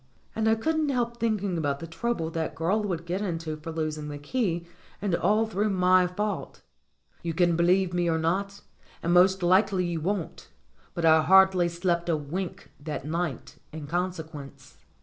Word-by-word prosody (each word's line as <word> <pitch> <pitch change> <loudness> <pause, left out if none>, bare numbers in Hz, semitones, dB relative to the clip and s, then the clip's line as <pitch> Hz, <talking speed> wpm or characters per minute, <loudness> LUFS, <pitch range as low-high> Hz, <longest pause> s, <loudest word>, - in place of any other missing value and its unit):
And 220 0 0
I 220 - +4
couldn't 310 +6 0
help 240 -3 -1
thinking 205 -6 -1
about 145 -3 -1
the 165 - -6
trouble 165 -1 -2
that 165 -1 -3
girl 185 +7 +1
would 175 -5 -3
get 180 +3 -2
into 165 -5 -3
for 155 +2 -7
losing 155 -2 -3
the 145 - -6
key, 170 - -2 0.3
and 195 -2 -2
all 210 +6 +2
through 210 0 -1
my 185 -1 +4
fault. 205 +3 -4 0.6
You 165 -2 -3
can 175 -1 +3
believe 180 +2 +2
me 175 -1 +1
or 160 - +1
not 195 +5 -1 0.4
and 170 - +1
most 185 +1 +5
likely 185 +1 +3
you 170 -2 -2
won't 185 0 -3 0.5
but 170 - -1
I 160 0 +6
hardly 190 0 +5
slept 170 0 -1
a 160 - +2
wink 180 +6 -5
that 145 -2 -5
night 165 -4 -3
in 155 -1 -7
consequence. 160 -4 -5
175 Hz, 170 wpm, -27 LUFS, 165-195 Hz, 0.6 s, I